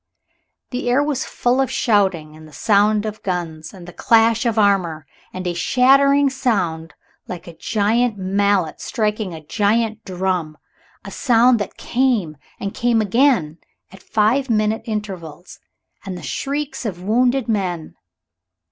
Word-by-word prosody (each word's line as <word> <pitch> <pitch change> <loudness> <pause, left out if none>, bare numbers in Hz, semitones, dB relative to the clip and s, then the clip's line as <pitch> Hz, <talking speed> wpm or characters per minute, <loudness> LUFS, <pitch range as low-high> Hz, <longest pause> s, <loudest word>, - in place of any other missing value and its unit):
The 250 -1 -2
air 265 +4 +3
was 290 -3 -2
full 245 +2 +1
of 270 - 0
shouting, 190 - +1
and 155 0 -13
the - - -16
sound 210 0 +2
of 215 0 -5
guns, 165 -4 -4
and 180 -3 -12
the 175 - -10
clash 230 +1 +3
of 230 -1 -1
armor, 185 -7 +1 0.3
and 185 0 -6
a 175 - -1
shattering 275 +8 +4
sound 180 - -1 0.3
like 180 -2 -7
a 170 - -11
giant 220 +4 0
mallet 195 -2 0
striking 215 -4 -2
a 155 -1 -11
giant 220 +4 0
drum 180 -5 -2 0.5
a - - -8
sound 240 -1 +3
that 205 - -5
came 235 -11 0 0.2
and 200 0 -4
came 240 -1 +1
again 215 - +2 0.3
at 190 0 -14
five 230 +8 +1
minute 215 0 +1
intervals 185 -7 -6 0.4
and 190 -3 -6
the 175 - -10
shrieks 280 - -3
of 180 -6 -5
wounded 245 +5 +1
men. 185 -7 -2
210 Hz, 145 wpm, -20 LUFS, 180-240 Hz, 0.5 s, shattering